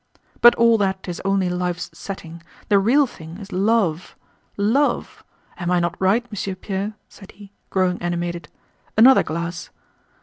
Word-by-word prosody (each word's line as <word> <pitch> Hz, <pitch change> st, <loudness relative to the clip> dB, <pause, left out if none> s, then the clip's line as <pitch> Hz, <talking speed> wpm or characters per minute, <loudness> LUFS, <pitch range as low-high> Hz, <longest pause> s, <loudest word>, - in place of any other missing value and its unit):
"But 240 Hz, -, +8 dB
all 230 Hz, -1 st, +4 dB
that 190 Hz, -1 st, -1 dB
is 175 Hz, -, -5 dB
only 195 Hz, -1 st, +1 dB
life's 180 Hz, 0 st, -3 dB
setting, 170 Hz, -2 st, -8 dB, 0.3 s
the 200 Hz, -, +5 dB
real 255 Hz, +9 st, +4 dB
thing 165 Hz, -8 st, -11 dB
is 200 Hz, 0 st, -11 dB
love—love! 205 Hz, -, -1 dB, 0.4 s
Am 175 Hz, -1 st, -2 dB
I 180 Hz, -1 st, +3 dB
not 170 Hz, +1 st, -2 dB
right, 205 Hz, +6 st, +2 dB
Monsieur 200 Hz, -2 st, -4 dB
Pierre?" 200 Hz, +2 st, -4 dB
said 195 Hz, -, -15 dB
he, 200 Hz, -1 st, -15 dB, 0.2 s
growing 185 Hz, -1 st, 0 dB
animated. 175 Hz, 0 st, -3 dB, 0.5 s
"Another 255 Hz, +4 st, +7 dB
glass?" 170 Hz, +1 st, -5 dB
190 Hz, 140 wpm, -21 LUFS, 175-210 Hz, 0.5 s, But